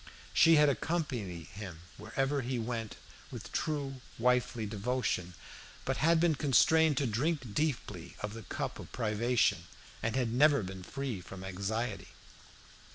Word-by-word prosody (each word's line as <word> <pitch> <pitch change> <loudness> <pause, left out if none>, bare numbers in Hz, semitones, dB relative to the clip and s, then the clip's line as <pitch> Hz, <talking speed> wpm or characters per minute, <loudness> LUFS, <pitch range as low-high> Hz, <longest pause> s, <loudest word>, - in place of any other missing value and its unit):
She 165 0 +7
had 150 -1 +6
accompanied 125 - -1
him 95 -4 -8
wherever 135 - -1
he 125 +1 -2
went 115 -1 -3 0.3
with - - -8
true 140 -4 -2 0.2
wifely 125 -1 +2
devotion, 105 -4 -1 0.5
but 135 -1 0
had 165 +2 +4
been 170 -1 +4
constrained 150 +2 +4
to 140 - +2
drink 130 +1 -1
deeply 120 - -2
of 105 0 -4
the 115 - -7
cup - - -4
of - - -9
privation, 115 -5 +1 0.4
and 110 +1 -1
had 120 -3 0
never 140 -1 +5
been 95 0 -6
free 130 0 -4
from 95 +1 -9
anxiety. 100 +3 -3
120 Hz, 140 wpm, -32 LUFS, 105-140 Hz, 0.5 s, She